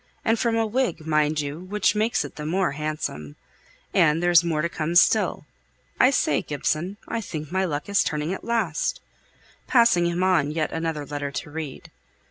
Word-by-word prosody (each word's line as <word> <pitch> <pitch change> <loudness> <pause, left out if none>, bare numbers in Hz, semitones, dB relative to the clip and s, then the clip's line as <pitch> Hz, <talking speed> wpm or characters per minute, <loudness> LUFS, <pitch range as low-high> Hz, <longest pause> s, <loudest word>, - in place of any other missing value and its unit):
and 225 -1 +2
from 230 0 +1
a 225 0 +2
Whig, 215 -8 -1
mind 155 -1 +1
you, 145 +2 -5
which 205 +4 0
makes 215 +2 0
it - - -10
the 150 - -6
more 175 +2 0
handsome. 145 - -4 0.6
And 155 +3 +3
there's 175 -1 +5
more 160 -3 -1
to - - +2
come 165 0 -3
still. 175 - +3 0.5
I 255 - +6
say, 150 - +1
Gibson, 155 +6 -2
I 230 - -2
think 155 -6 -6
my 190 +1 +1
luck 150 -4 -3
is 200 -1 +3
turning 150 +3 -2
at - - -7
last," 220 -9 -1 0.7
passing 230 -9 +4
him 170 +1 -1
on 180 -6 +3
yet 155 0 -2
another 160 -2 -3
letter 145 0 -4
to 140 +2 -6
read. 155 -3 -7
165 Hz, 180 wpm, -24 LUFS, 150-195 Hz, 0.7 s, I